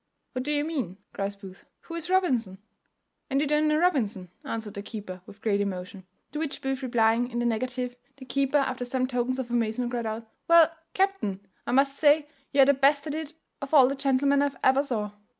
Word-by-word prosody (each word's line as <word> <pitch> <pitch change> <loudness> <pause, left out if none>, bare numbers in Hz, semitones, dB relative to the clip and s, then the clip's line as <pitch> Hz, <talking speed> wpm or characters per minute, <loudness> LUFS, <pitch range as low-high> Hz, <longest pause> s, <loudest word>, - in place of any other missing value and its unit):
"What 255 - -3
do 295 - -2
you 290 -1 +1
mean?" 265 - -3 0.2
cries 200 0 -3
Booth; 195 -1 -13
"who 335 - -10
is 335 0 -4
Robinson?" 255 - +1 0.7
"And 275 0 +1
you 295 - +2
don't 300 +1 +2
know 305 0 +3
Robinson?" 225 - 0
answered 220 -2 -5
the 200 - -5
keeper 200 -4 -7
with 205 - -14
great 205 -2 +2
emotion. 190 0 -5 0.3
To 300 - -4
which 310 -3 -3
Booth 270 0 -2
replying 235 -1 +2
in 240 - -5
the 240 - 0
negative, 250 +2 -2 0.2
the 265 - -11
keeper, 275 +3 +1
after 260 -2 0
some 255 +1 -1
tokens 250 0 -1
of 250 -2 -4
amazement, 240 +1 0
cried 235 -2 -2
out, 220 +1 -4 0.2
"Well, 335 -1 +6 0.2
captain, 380 - 0 0.2
I - - 0
must 275 +1 +3
say 295 0 +4 0.2
you 280 - +5
are - - +8
the 280 - +5
best 280 +1 +3
at 300 - -3
it 315 0 -5 0.3
of 275 +2 -1
all 265 -3 +8
the 270 - -1
gentlemen 275 +1 +2
I 285 - +2
ever 265 +1 +5
saw. 220 -7 -3
255 Hz, 210 wpm, -27 LUFS, 225-285 Hz, 0.7 s, are